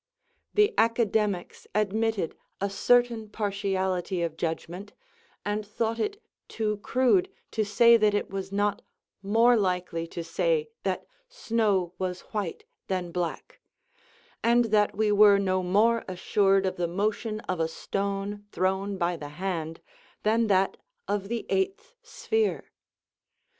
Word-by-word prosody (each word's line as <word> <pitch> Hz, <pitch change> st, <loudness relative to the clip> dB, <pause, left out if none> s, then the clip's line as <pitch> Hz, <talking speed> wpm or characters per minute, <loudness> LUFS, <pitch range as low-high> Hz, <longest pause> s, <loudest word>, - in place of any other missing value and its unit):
The 420 Hz, -1 st, +4 dB
Academics 220 Hz, -4 st, +1 dB
admitted 215 Hz, -3 st, 0 dB, 0.2 s
a 200 Hz, 0 st, -1 dB
certain 235 Hz, 0 st, +2 dB
partiality 190 Hz, -4 st, -1 dB
of 165 Hz, -2 st, -2 dB
judgment, 175 Hz, +4 st, -4 dB, 0.5 s
and 210 Hz, +1 st, -1 dB
thought 225 Hz, +2 st, -2 dB
it 415 Hz, -, -2 dB, 0.3 s
too 210 Hz, -2 st, -2 dB
crude 260 Hz, -, +2 dB, 0.2 s
to 220 Hz, -, 0 dB
say 235 Hz, +3 st, +6 dB
that 210 Hz, -2 st, +3 dB
it 205 Hz, -, -2 dB
was 195 Hz, 0 st, -4 dB
not 205 Hz, +1 st, 0 dB, 0.4 s
more 225 Hz, +5 st, +4 dB
likely 180 Hz, -5 st, -1 dB
to 170 Hz, 0 st, -6 dB
say 465 Hz, -, 0 dB
that -, -, -2 dB, 0.2 s
snow 215 Hz, -, 0 dB
was 185 Hz, -1 st, -3 dB
white 205 Hz, -6 st, -3 dB, 0.2 s
than 180 Hz, -2 st, -2 dB
black; 175 Hz, -, -4 dB, 0.8 s
and 235 Hz, +1 st, +4 dB
that 210 Hz, -1 st, +3 dB
we 215 Hz, -1 st, +2 dB
were 205 Hz, -1 st, +7 dB
no 185 Hz, -1 st, +1 dB
more 215 Hz, +6 st, +3 dB
assured 195 Hz, +1 st, +2 dB
of 185 Hz, -, -2 dB
the 175 Hz, -1 st, 0 dB
motion 215 Hz, +4 st, -1 dB
of 185 Hz, -2 st, -3 dB
a 160 Hz, -, +2 dB
stone, 200 Hz, +4 st, -3 dB
thrown 190 Hz, +2 st, -1 dB
by 175 Hz, -1 st, 0 dB
the 145 Hz, -3 st, -7 dB
hand, 165 Hz, -1 st, -4 dB, 0.4 s
than 225 Hz, +2 st, +3 dB
of -, -, -2 dB
that 190 Hz, -1 st, +2 dB, 0.3 s
of 200 Hz, -1 st, -1 dB
the 235 Hz, -1 st, -3 dB
eighth 390 Hz, +5 st, -1 dB
sphere. 460 Hz, -3 st, -1 dB
205 Hz, 135 wpm, -27 LUFS, 185-225 Hz, 0.8 s, were